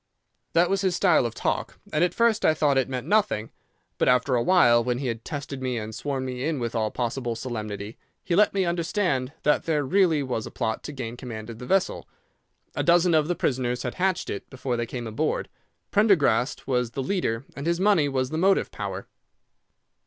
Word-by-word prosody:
"'That 170 Hz, +1 st, +4 dB
was 195 Hz, +1 st, 0 dB
his 190 Hz, -3 st, +1 dB
style 175 Hz, -10 st, +3 dB
of 115 Hz, -, -9 dB
talk, -, -, -2 dB, 0.2 s
and 155 Hz, -, +3 dB
at 180 Hz, -, +2 dB
first 230 Hz, -2 st, +2 dB
I 155 Hz, -, +4 dB
thought 145 Hz, -2 st, +2 dB
it 135 Hz, 0 st, +1 dB
meant 130 Hz, -1 st, -4 dB
nothing; 205 Hz, -, +1 dB, 0.5 s
but -, -, +2 dB
after 125 Hz, +1 st, +3 dB
a 120 Hz, -, +3 dB
while, 120 Hz, -8 st, +5 dB
when 125 Hz, 0 st, -1 dB
he 135 Hz, -, -4 dB
had 115 Hz, -2 st, -3 dB
tested 145 Hz, -3 st, -6 dB
me 130 Hz, -2 st, -1 dB
and 110 Hz, 0 st, -5 dB
sworn 135 Hz, +3 st, -3 dB
me 125 Hz, 0 st, -4 dB
in 155 Hz, 0 st, 0 dB
with 115 Hz, -1 st, -3 dB
all 110 Hz, -2 st, 0 dB
possible 120 Hz, 0 st, -2 dB
solemnity, 110 Hz, -3 st, -5 dB, 0.2 s
he 170 Hz, -, 0 dB
let 210 Hz, +3 st, +5 dB
me 195 Hz, -2 st, 0 dB
understand 170 Hz, -6 st, 0 dB
that 150 Hz, -, +2 dB
there 155 Hz, -3 st, +1 dB
really 165 Hz, -2 st, +3 dB
was 125 Hz, -4 st, -3 dB
a -, -, -7 dB
plot 110 Hz, -3 st, -2 dB
to -, -, -5 dB
gain 120 Hz, -4 st, -6 dB
command 115 Hz, -3 st, -7 dB
of 115 Hz, -, -10 dB
the 125 Hz, -, -8 dB
vessel. 195 Hz, -1 st, 0 dB, 0.6 s
A -, -, -1 dB
dozen 175 Hz, 0 st, +4 dB
of 155 Hz, -1 st, +3 dB
the 175 Hz, -, 0 dB
prisoners 125 Hz, -4 st, -1 dB
had 125 Hz, -, -3 dB
hatched 185 Hz, -1 st, -1 dB
it 100 Hz, -, -6 dB
before 130 Hz, -1 st, -3 dB
they 120 Hz, 0 st, -2 dB
came 120 Hz, -1 st, -5 dB
aboard, 120 Hz, +8 st, -2 dB, 0.4 s
Prendergast 155 Hz, -, +3 dB
was 125 Hz, -3 st, 0 dB
the 135 Hz, -, -2 dB
leader, 130 Hz, -, -1 dB
and 140 Hz, +3 st, -5 dB
his 170 Hz, 0 st, +1 dB
money 190 Hz, -7 st, +3 dB
was 130 Hz, -1 st, -1 dB
the 155 Hz, -, -1 dB
motive 195 Hz, +2 st, +3 dB
power. 100 Hz, -2 st, -5 dB
135 Hz, 210 wpm, -25 LUFS, 120-170 Hz, 0.6 s, while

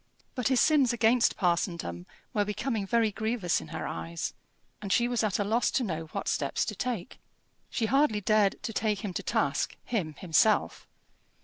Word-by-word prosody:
But 250 Hz, -3 st, -1 dB
his 260 Hz, -2 st, +3 dB
sins 290 Hz, -6 st, +4 dB
against 235 Hz, 0 st, +3 dB
parsondom 170 Hz, -, -1 dB, 0.3 s
were 205 Hz, -, +2 dB
becoming 210 Hz, 0 st, -2 dB
very 230 Hz, 0 st, +2 dB
grievous 220 Hz, -, -1 dB
in 80 Hz, -, -10 dB
her -, -, -5 dB
eyes, 85 Hz, 0 st, -4 dB, 0.5 s
and 200 Hz, -2 st, -4 dB
she 240 Hz, +5 st, +3 dB
was 240 Hz, -2 st, 0 dB
at 210 Hz, -3 st, +1 dB
a 205 Hz, -, +1 dB
loss 225 Hz, +4 st, +1 dB
to 265 Hz, -, 0 dB
know 165 Hz, -6 st, -3 dB
what 160 Hz, -, -5 dB
steps -, -, 0 dB
to -, -, -4 dB
take. 235 Hz, -8 st, -4 dB, 0.5 s
She 225 Hz, -, -1 dB
hardly 270 Hz, -2 st, +3 dB
dared 205 Hz, 0 st, +2 dB
to 225 Hz, -, -4 dB
take 210 Hz, 0 st, -1 dB
him 195 Hz, -, -4 dB
to -, -, -3 dB
task, -, -, 0 dB
him 175 Hz, -10 st, -2 dB
himself. 185 Hz, +5 st, +2 dB
215 Hz, 180 wpm, -29 LUFS, 180-235 Hz, 0.5 s, sins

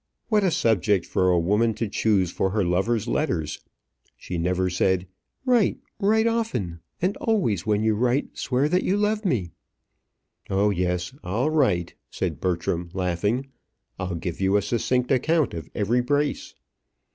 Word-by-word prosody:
What 210 Hz, -2 st, +3 dB
a 190 Hz, -, +4 dB
subject 105 Hz, -, +2 dB
for 95 Hz, -, +1 dB
a 90 Hz, -, +4 dB
woman 105 Hz, +6 st, +2 dB
to 115 Hz, -, -2 dB
choose 100 Hz, -4 st, +1 dB
for 95 Hz, -, 0 dB
her 100 Hz, 0 st, 0 dB
lover's 100 Hz, +6 st, 0 dB
letters! 85 Hz, -, -1 dB, 0.6 s
She 90 Hz, -1 st, -5 dB
never 90 Hz, +2 st, +1 dB
said, 90 Hz, +1 st, +1 dB, 0.4 s
"Write, 245 Hz, -5 st, +3 dB, 0.2 s
write 220 Hz, +2 st, +3 dB
often; 220 Hz, -, -1 dB, 0.2 s
and 190 Hz, +3 st, +1 dB
always 115 Hz, -, 0 dB
when 105 Hz, 0 st, +2 dB
you 110 Hz, 0 st, +3 dB
write, 125 Hz, +5 st, 0 dB
swear 130 Hz, +3 st, 0 dB
that 180 Hz, +4 st, +2 dB
you 195 Hz, -, +1 dB
love 210 Hz, +1 st, 0 dB
me." 105 Hz, -, 0 dB, 1.0 s
"Oh, 100 Hz, +2 st, +2 dB
yes, 90 Hz, +2 st, -1 dB
I'll 115 Hz, +12 st, 0 dB
write," 90 Hz, -, +1 dB, 0.2 s
said -, -, -3 dB
Bertram, 85 Hz, -1 st, -1 dB
laughing. 100 Hz, +8 st, -1 dB, 0.5 s
"I'll 90 Hz, -1 st, -3 dB
give 85 Hz, +1 st, -5 dB
you 95 Hz, +1 st, +3 dB
a 100 Hz, -, 0 dB
succinct 125 Hz, +4 st, 0 dB
account 155 Hz, +3 st, +2 dB
of 85 Hz, -1 st, -6 dB
every 115 Hz, +4 st, +1 dB
brace." 145 Hz, +3 st, -1 dB
105 Hz, 155 wpm, -25 LUFS, 90-140 Hz, 1.0 s, a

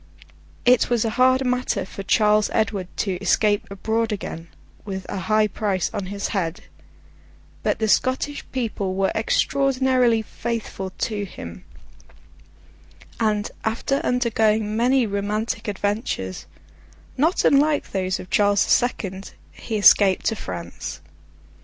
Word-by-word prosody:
It 250 Hz, 0 st, +4 dB
was 235 Hz, -2 st, +1 dB
a 225 Hz, -, 0 dB
hard 255 Hz, +2 st, +3 dB
matter 250 Hz, -6 st, 0 dB
for 195 Hz, -, -8 dB
Charles 210 Hz, +1 st, +3 dB
Edward 205 Hz, -4 st, 0 dB
to 190 Hz, -3 st, -1 dB
escape 205 Hz, +1 st, +2 dB
abroad 220 Hz, +3 st, -1 dB
again, 170 Hz, -5 st, -5 dB, 0.4 s
with 190 Hz, -2 st, -5 dB
a 195 Hz, -, -4 dB
high 215 Hz, +3 st, +2 dB
price 200 Hz, -3 st, -1 dB
on 200 Hz, -3 st, -3 dB
his 200 Hz, +1 st, -3 dB
head; 175 Hz, -5 st, -2 dB, 1.0 s
but -, -, 0 dB
the 220 Hz, -, 0 dB
Scottish 260 Hz, +6 st, +1 dB
people 210 Hz, -7 st, -2 dB
were 195 Hz, 0 st, +1 dB
extraordinarily 255 Hz, -1 st, +2 dB
faithful 220 Hz, -4 st, -4 dB
to 205 Hz, +2 st, -3 dB
him, 85 Hz, -, -10 dB, 1.5 s
and, 210 Hz, -2 st, 0 dB
after 230 Hz, +5 st, 0 dB
undergoing 220 Hz, -4 st, +1 dB
many 250 Hz, +2 st, +3 dB
romantic 210 Hz, +3 st, -2 dB
adventures, 205 Hz, -, -3 dB, 0.7 s
not 320 Hz, +7 st, +2 dB
unlike 290 Hz, +1 st, +3 dB
those 185 Hz, -1 st, -1 dB
of 180 Hz, -, -10 dB
Charles 205 Hz, -1 st, +3 dB
the -, -, -2 dB
Second, 195 Hz, -6 st, 0 dB, 0.2 s
he 220 Hz, -, -4 dB
escaped 200 Hz, -2 st, +5 dB
to 225 Hz, -, +1 dB
France. 85 Hz, -, -6 dB
215 Hz, 125 wpm, -23 LUFS, 195-240 Hz, 1.5 s, escaped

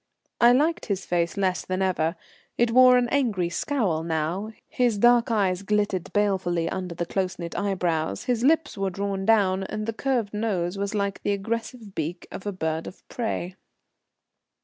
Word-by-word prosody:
I 240 Hz, 0 st, +7 dB
liked 300 Hz, +7 st, +2 dB
his 195 Hz, -3 st, -2 dB
face 170 Hz, +1 st, 0 dB
less 185 Hz, -2 st, 0 dB
than 185 Hz, +1 st, -1 dB
ever. 170 Hz, -3 st, 0 dB, 0.4 s
It 235 Hz, -1 st, +2 dB
wore 255 Hz, +1 st, +7 dB
an 245 Hz, -1 st, +2 dB
angry 225 Hz, -11 st, +1 dB
scowl 180 Hz, -, 0 dB
now; 165 Hz, +6 st, -2 dB, 0.2 s
his 240 Hz, -4 st, +1 dB
dark 240 Hz, +3 st, +5 dB
eyes 195 Hz, -5 st, +1 dB
glittered 205 Hz, -3 st, -1 dB
balefully 185 Hz, -5 st, +1 dB
under 180 Hz, -1 st, -4 dB
the 170 Hz, -, -2 dB
close 185 Hz, +1 st, -2 dB
knit 170 Hz, -1 st, -6 dB
eyebrows, 180 Hz, -5 st, -1 dB
his 245 Hz, -2 st, 0 dB
lips 315 Hz, +2 st, +2 dB
were 195 Hz, -1 st, -1 dB
drawn 195 Hz, +1 st, -3 dB
down, 195 Hz, -4 st, +3 dB
and 215 Hz, +2 st, -4 dB
the 225 Hz, -, -2 dB
curved 235 Hz, -4 st, -1 dB
nose 200 Hz, -5 st, -1 dB
was 200 Hz, +1 st, -3 dB
like 200 Hz, -1 st, -1 dB
the 205 Hz, -, 0 dB
aggressive 225 Hz, +1 st, -4 dB
beak 170 Hz, +2 st, -4 dB
of 195 Hz, -, -7 dB
a -, -, 0 dB
bird 160 Hz, -3 st, -3 dB
of -, -, -12 dB
prey. 190 Hz, -6 st, -3 dB
200 Hz, 170 wpm, -25 LUFS, 180-225 Hz, 0.4 s, I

